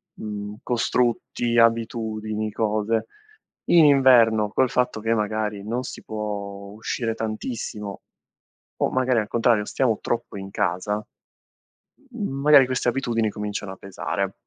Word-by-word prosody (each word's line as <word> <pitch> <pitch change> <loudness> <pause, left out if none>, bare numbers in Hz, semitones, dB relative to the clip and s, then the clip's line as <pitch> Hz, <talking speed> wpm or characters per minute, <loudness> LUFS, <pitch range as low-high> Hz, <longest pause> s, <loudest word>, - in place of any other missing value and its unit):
mhmm, 105 -1 -6
costrutti, 120 0 0
abitudini, 110 -2 0
cose; 110 +1 0 0.7
in 170 -2 +7
inverno 120 -6 +5
col 130 +3 +2
fatto 125 -3 0
che, 115 +1 +1
magari, 105 -1 -1
non 120 +3 -2
si - - -7
può 100 -2 -5
uscire 115 +2 -3
tantissimo 110 -2 -5 0.7
o - - +1
magari 130 -2 +2
al 105 - -2
contrario, 115 -2 +2
stiamo 120 -5 0
troppo 115 -3 -3
in 95 0 -7
casa, 105 +2 -1 1.1
mhmm, 205 - -4
magari 145 -2 +7
queste 125 -1 -1
abitudini 115 -4 0
cominciano 105 -1 -5
a - - -10
pesare. 95 +1 -3
110 Hz, 125 wpm, -24 LUFS, 105-120 Hz, 1.1 s, in